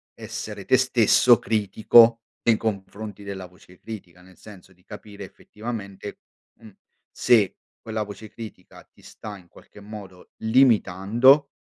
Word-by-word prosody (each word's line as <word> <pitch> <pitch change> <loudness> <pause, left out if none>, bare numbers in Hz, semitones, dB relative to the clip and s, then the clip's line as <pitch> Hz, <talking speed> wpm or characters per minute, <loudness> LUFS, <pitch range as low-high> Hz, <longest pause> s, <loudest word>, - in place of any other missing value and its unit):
essere - - -8
te - - +4
stesso - - +4
critico 115 +2 +4 0.2
nei 115 -2 +3
confronti 105 0 -5
della 95 -2 -7
voce 90 0 -19
critica. 90 -5 -11
Nel 95 -1 -19
senso 95 -3 -15
di 90 - -30
capire 105 0 -11
effettivamente, 105 -1 -9 0.4
uhm, 110 -4 -16 0.4
se 110 -6 +2 0.3
quella 110 -1 -4
voce 105 +1 -10
critica 105 -5 -12
ti - - -26
sta 105 -2 -10
in 90 - -19
qualche 95 - -18
modo 100 -3 -12
limitando, 120 +3 +3
105 Hz, 130 wpm, -23 LUFS, 95-110 Hz, 0.4 s, te